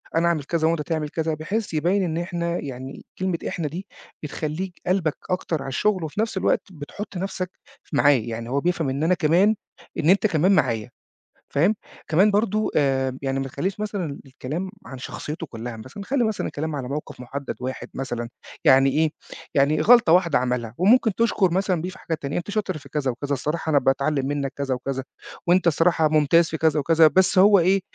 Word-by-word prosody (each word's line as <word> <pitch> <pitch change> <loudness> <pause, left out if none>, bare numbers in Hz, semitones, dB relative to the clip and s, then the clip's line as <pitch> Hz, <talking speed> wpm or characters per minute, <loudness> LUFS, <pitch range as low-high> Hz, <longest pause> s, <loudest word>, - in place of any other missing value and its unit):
أنا 165 +1 +3
أعمل 165 -4 +1
كذا 160 +2 0
وأنت 165 -1 +1
تعمل 150 0 -2
كذا 160 +1 -1
بحيث 180 +7 -3
يبيّن 175 +6 +2
إن 165 -3 -2
إحنا 170 0 -2
يعني، 130 -1 -7
كلمة 185 -2 0
إحنا 165 -3 -2
دي 180 +7 -6 0.4
بتخلّيك 155 +5 -4
قلْبك 180 -4 +1
أكتر 175 -4 -1
على 135 - -5
الشغل 185 +7 +1
وفي 160 +7 -2
نفس 220 -3 -2
الوقت - - +2
بتحُط 180 +5 -8
نفْسَك 185 0 -3 0.3
ف - - -21
معاه، 145 0 +5
يعني 115 -2 -3
هو 135 +3 +1
بيفهَم 170 -4 0
إن 135 +3 -2
أنا 170 +3 +3
كمان 180 +6 +3 0.4
إن 155 - +1
أنت 200 +3 +5
كمان 175 +1 +2
معايا 115 - +1 0.6
فاهم، 175 +10 +2 0.3
كمان 190 +7 +4
برضه 215 +1 +1
آآ 135 -2 +2
ب 130 - -7
يعني 135 0 -1
ما 135 - -3
تخلّيش 185 +10 -3
مثلًا 200 -9 -3
الكلام 145 +7 -5 0.2
عن 130 - -8
شخصيته 150 +5 -6
كلّها 115 -2 -7
مثلًا، 130 - -9
خلّي 255 +3 +1
مثلًا 220 -2 -1
الكلام 155 +1 -4
على 130 -3 -4
موقِف 145 -1 -5
مُحدّد 140 +3 -5
واحد 130 +1 -5
مثلًا، 120 -3 -4 0.4
يعني 135 +1 +6
إيه، 155 +3 +2 0.4
يعني 140 +2 +3
غلطة 235 -8 +6
واحدة 175 -5 +4
عمَلها 125 -2 -2
وممكن 215 +3 +4
تشكُر 215 -5 +2
مثلًا 185 -2 +1
بيه 180 - -3
في 185 - -12
حاجات 160 -2 -4
تانية، 140 +1 -3
أنت 175 +4 -4
شاطر 200 -5 -1
في 145 -2 -14
كذا 140 -3 -1
وكذا 140 +4 -4
الصراحة 150 +4 -2
أنا 145 -2 +4
باتعلّم 135 +1 +1
منك 140 -1 -2
كذا 140 -2 -1
وكذا 135 +1 -4 0.4
وأنت 175 +1 +4
الصراحة 165 0 +3
ممتاز 155 +2 +4
في 160 - -3
كذا 160 -1 +2
وكذا 160 +2 +5
بس 185 +4 +3
هو 200 +1 +7
إيه، 190 +3 +3
160 Hz, 195 wpm, -23 LUFS, 140-185 Hz, 0.6 s, هو